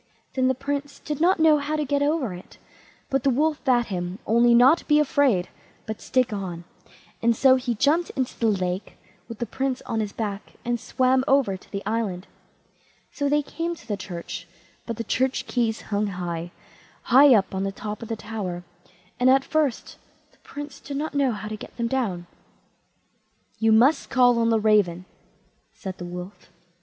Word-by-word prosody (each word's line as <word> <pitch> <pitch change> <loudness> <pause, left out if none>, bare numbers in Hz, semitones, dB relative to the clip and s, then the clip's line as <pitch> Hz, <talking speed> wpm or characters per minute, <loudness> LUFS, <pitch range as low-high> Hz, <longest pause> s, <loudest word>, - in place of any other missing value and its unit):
Then 260 -1 +2
the 260 - +2
Prince 285 +2 -4
did 300 0 -5
not 360 +2 +4
know 315 -2 +5
how 295 +2 -2
to 300 -1 -1
get 285 +1 0
over 285 - 0
it, 180 +1 -12 0.5
but 270 0 +2
the 275 - +3
Wolf 300 +4 +1
bade 245 -4 +3
him 180 +1 -3
only 235 +2 +4
not 260 +8 +5
be 300 - +5
afraid, 270 -10 +2 0.4
but 220 -1 -6
stick 255 -4 +1
on, 180 -4 -5 0.6
and 235 0 +3
so 260 +2 +5
he 250 -2 -1
jumped 300 +9 +2
into 260 -2 -2
the 230 - +2
lake 185 -2 -2 0.3
with 230 - -7
the 235 - -2
Prince 265 +3 -3
on 225 - -2
his 210 -2 -2
back, 205 -2 -5
and 240 0 0
swam 255 +2 +1
over 270 -9 +3
to 185 - -15
the 200 -1 -5
island. 210 -4 -2 0.9
So 285 -1 -1
they 295 +1 +2
came 335 +4 -4
to - - -17
the 210 - -1
church; 175 -3 -7 0.4
but 230 -2 -4
the 230 - -3
church 260 +4 0
keys 230 -3 -1
hung 205 0 -1
high, 175 -3 -4 0.5
high 265 +1 +7
up 195 -2 +1
on 190 0 -1
the 195 - -1
top 210 +1 -6
of 230 - -7
the 225 - -3
tower, 205 -5 -5 0.6
and 250 +1 +4
at 270 +1 +4
first 305 -5 -1 0.3
the - - -30
Prince 290 -1 -9
did 280 -1 -6
not 310 +2 -3
know 280 -3 +2
how 210 -1 -5
to 215 - -4
get - - -11
them 235 - -1
down. 220 -9 -2 1.3
"You 225 0 +3
must 245 +8 +4
call 245 -2 +4
on 230 0 +2
the 225 -1 +3
raven", 205 -5 +2 0.7
said 190 -1 -7
the 175 - -5
Wolf. 180 +3 -9
235 Hz, 190 wpm, -24 LUFS, 200-275 Hz, 1.3 s, high